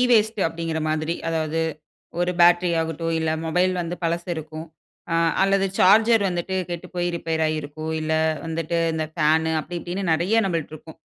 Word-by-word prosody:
Waste 220 -4 +3
அப்படிங்கிற 165 -1 -3
மாதிரி, 155 +1 -1
அதாவது 160 0 -1 0.6
ஒரு 175 0 +1
பேட்டரி 175 +1 +5
ஆகட்டும். 165 +1 -2
இல்ல 160 0 0 0.2
மொபைல் 180 +3 +2
வந்து 175 +1 -4
பழசு 170 +2 -1
இருக்கும். 155 +1 -7 0.5
அ - - +1 0.3
அல்லது 195 0 +3
சார்ஜர் 220 +3 +5
வந்துட்டு 180 +1 -2
கெட்டு 175 +1 -5
போய் 175 0 0
ரிப்பேர் 160 -1 -2
ஆயிருக்கும். 155 +1 -4
இல்ல 155 0 -2 0.3
வந்துட்டு 165 +1 -2 0.2
இந்த 160 -1 -1
ஃபேனு 160 0 +2
அப்படி 175 +3 -6
இப்படின்னு 185 +3 -4
நிறைய 195 +8 +2
நம்மள்ட்ட 165 -4 -3
இருக்கும். 160 +1 -14
165 Hz, 155 wpm, -23 LUFS, 160-180 Hz, 0.6 s, பேட்டரி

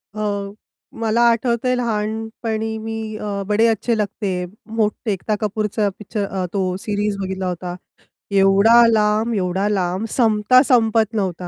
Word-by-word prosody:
अ, 200 -2 -2 0.5
मला 225 +1 +1
आठवतंय 235 +2 +1
लहानपणी 220 -1 -3
मी 220 -1 -5
अ, 200 -1 -4
"बडे 210 +2 +3
अच्छे 225 +1 0
लगते 210 0 -3
है." 180 0 -2 0.3
मोठे 215 +1 0
एकता 205 +2 -1
कपूरचा 210 0 -1
पिक्चर 210 0 -4
अ, 190 -2 -3
तो 185 -2 -1
सीरीज 205 0 -2
बघितला 190 0 -4
होता. 180 0 -4 0.6
एवढा 200 +4 +5
लांब, 215 +1 +2
एवढा 190 0 0
लांब 190 0 -1
संपता 225 +1 +4
संपत 225 -4 +2
नव्हता. 185 -4 -2
210 Hz, 135 wpm, -20 LUFS, 200-225 Hz, 0.6 s, एवढा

